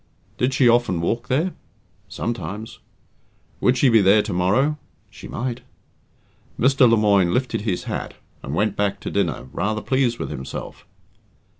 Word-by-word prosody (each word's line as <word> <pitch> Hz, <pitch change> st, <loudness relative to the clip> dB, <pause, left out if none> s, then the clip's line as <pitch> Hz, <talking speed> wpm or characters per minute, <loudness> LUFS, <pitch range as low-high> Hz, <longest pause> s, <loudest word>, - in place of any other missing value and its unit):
"Did 130 Hz, +1 st, +1 dB
she 130 Hz, -, +4 dB
often 120 Hz, -7 st, +3 dB
walk 115 Hz, +9 st, -2 dB
there?" 155 Hz, +9 st, 0 dB, 0.6 s
"Sometimes." 105 Hz, 0 st, -5 dB, 0.8 s
"Would 125 Hz, +1 st, +2 dB
she 135 Hz, -, +4 dB
be 115 Hz, -3 st, +5 dB
there 100 Hz, +2 st, +5 dB
tomorrow?" 105 Hz, +11 st, +1 dB, 0.3 s
"She -, -, -11 dB
might." 120 Hz, 0 st, -4 dB, 1.0 s
Mr. 130 Hz, -1 st, +5 dB
Lemoine 100 Hz, -5 st, +3 dB
lifted 125 Hz, -3 st, -1 dB
his 100 Hz, -5 st, -2 dB
hat, -, -, -5 dB, 0.3 s
and 70 Hz, -, -5 dB
went 105 Hz, +2 st, 0 dB
back 100 Hz, -1 st, -1 dB
to -, -, -5 dB
dinner, -, -, -1 dB
rather 110 Hz, +1 st, -1 dB
pleased 130 Hz, -3 st, +1 dB
with -, -, -5 dB
himself. 65 Hz, 0 st, -7 dB
115 Hz, 140 wpm, -22 LUFS, 100-125 Hz, 1.0 s, be